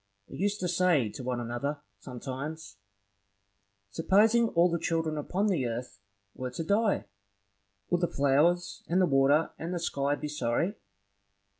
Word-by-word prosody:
They - - -10
used 205 +2 -1
to 180 - 0
say 175 -9 +2
to 130 +5 -8
one 125 -1 -2
another, 120 +5 -3 0.2
sometimes, 130 +1 -7 1.1
Supposing 215 - +4
all 175 -3 +3
the 170 -1 -1
children 165 -1 -1
upon 190 +7 0
earth 120 - -3 0.3
were 130 0 -5
to 165 +6 -5
die, 205 +4 +1 0.9
would 175 - +2
the 175 - +2
flowers, 155 +6 +2
and 175 +3 +2
the 185 - +5
water, 140 +1 +3
and 170 +3 -3
the - - -2
sky 140 -3 0
be 150 - -5
sorry? 150 +5 -1
155 Hz, 145 wpm, -29 LUFS, 135-180 Hz, 1.1 s, the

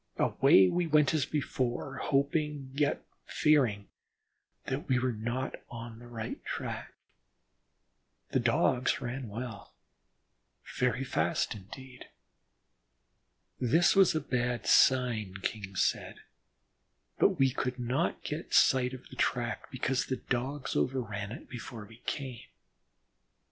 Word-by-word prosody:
Away 95 0 +5
we 175 - 0
went 150 -2 +4
as 150 -4 +1
before, 135 -2 -2
hoping, 145 0 0
yet 145 +1 0 0.2
fearing 125 -10 +2 0.8
that - - -3
we 130 - +4
were 125 +1 +1
not 120 +5 -3 0.2
on 115 -1 -8
the 120 - -12
right 115 -2 -6
track. - - -5 1.4
The - - +2
Dogs 125 +1 +2
ran 125 -1 -5
well, 110 - -7 1.0
very 125 +1 +1
fast 85 -10 0
indeed. 125 +6 -11 1.5
This 155 - +4
was 195 -4 +5
a - - +2
bad 120 -2 -1
sign, 120 -7 +4
King 100 -3 -4
said, - - 0 1.0
but - - +4
we 135 -1 +4
could 125 0 -2
not 125 +7 -1
get 150 +3 -3
sight 130 0 +4
of 130 - -13
the - - -11
track 120 -1 -1
because 130 0 -1
the 130 - -1
Dogs 130 +3 -3
overran 110 -6 -1
it 125 - -9
before 115 -2 -8
we 110 +2 -15
came. 130 -5 -4
125 Hz, 120 wpm, -31 LUFS, 115-135 Hz, 1.5 s, Away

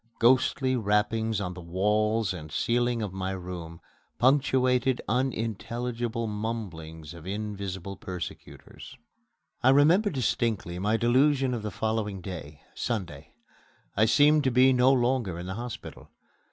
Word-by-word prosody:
Ghostly 130 +2 +3
rappings 110 0 +1
on 90 -3 -3
the 90 - -9
walls 105 +4 +1
and 80 -4 -8
ceiling 120 +7 0
of 100 -3 -5
my 95 0 -3
room 90 -3 -7 0.4
punctuated 130 -1 +3
unintelligible 120 -1 -2
mumblings 95 -8 -5
of 85 0 -11
invisible 100 -2 -5
persecutors. 90 -3 -8 0.6
I 130 - +5
remember 160 +10 +5
distinctly 115 - -1
my 105 +4 +1
delusion 130 +3 +3
of 120 - -3
the 105 - -3
following 105 -1 -2
day 80 -6 -8
Sunday. 90 -12 -4 0.6
I 110 - +4
seemed 145 +6 +5
to - - +4
be 130 +1 +5
no 125 +1 +5
longer 120 -8 +1
in 85 - -6
the 95 - -4
hospital. 120 +3 -8
110 Hz, 125 wpm, -27 LUFS, 95-125 Hz, 0.6 s, I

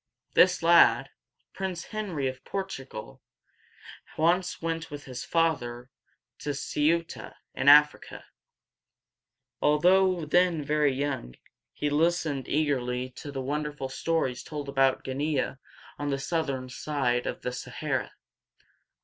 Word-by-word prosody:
This 180 -2 +4
lad, 170 0 +5 0.4
Prince 185 -3 -4
Henry 190 -11 -3
of 130 0 -6
Portugal, 135 - -6 1.0
once 175 +3 +1
went 165 0 -3
with 145 0 -8
his 125 -2 -7
father 130 -7 -1 0.5
to 145 - -5
Ceu´ta 165 +4 -1 0.2
in 140 - +3
Africa. 150 +1 +5 1.4
Although 180 +3 +4
then 175 0 +2
very 150 -1 +2
young, 135 - -3 0.4
he 145 - -2
listened 155 -3 +1
eagerly 130 -4 0
to 145 +3 -9
the 135 -1 -4
wonderful 145 0 -3
stories 135 -3 -1
told 150 -2 -6
about 135 -1 +2
Guin´ea, 140 0 -2 0.4
on 145 0 -2
the 140 - 0
southern 135 -3 -2
side 130 -2 -1
of - - -5
the 125 - -2
Sa 125 - -7
ha´ra. - - -2
145 Hz, 115 wpm, -28 LUFS, 135-165 Hz, 1.4 s, lad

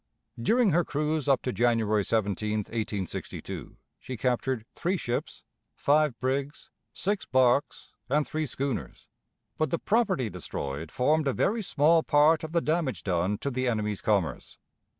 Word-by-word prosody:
During 225 - +3
her 175 +2 +3
cruise 150 0 -1
up 135 -3 +3
to 125 - -2
January 115 -3 +2
17, 105 0 0
1862, 105 -4 -5 0.2
she 130 - -6
captured 125 -1 -1
three 185 +2 -1
ships, 120 -6 -4 0.3
five 145 -4 +2
brigs, 135 +4 -2 0.2
six 205 +1 -2
barks, 130 +1 +2 0.2
and 150 +2 +2
three 155 0 -2
schooners, 135 0 -4 0.5
but 155 - +1
the 170 - 0
property 195 - +1
destroyed 80 -5 -5
formed 150 +4 +2
a 135 - +2
very 225 +3 +1
small 160 -3 +3
part 155 +2 +4
of 160 - -5
the 170 0 +2
damage 155 -4 -1
done 95 +2 0
to 140 - -3
the 130 0 -1
enemy's 105 -4 -1
commerce. 100 -6 -1
130 Hz, 145 wpm, -28 LUFS, 110-155 Hz, 0.5 s, part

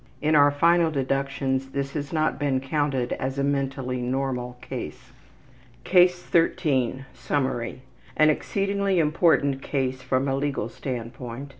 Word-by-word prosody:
In 155 +1 +1
our 145 -1 +6
final 165 +3 +3
deductions 135 -1 -1
this 140 0 -3
has 145 -2 -4
not 155 -3 0
been 140 -3 +1
counted 135 -2 -1
as 130 +1 -3
a 140 - 0
mentally 135 -2 -1
normal 125 -1 -2
case. - - -7 0.7
CASE 180 -1 +4
13 140 -7 +1
Summary: 130 -1 -2 0.3
An 155 0 +6
exceedingly 200 +3 -1
important 150 -4 +2
case 130 -2 -2
from 130 +2 0
a 135 - +1
legal 135 -5 -2
standpoint. 125 +1 -6
135 Hz, 130 wpm, -25 LUFS, 130-150 Hz, 0.7 s, our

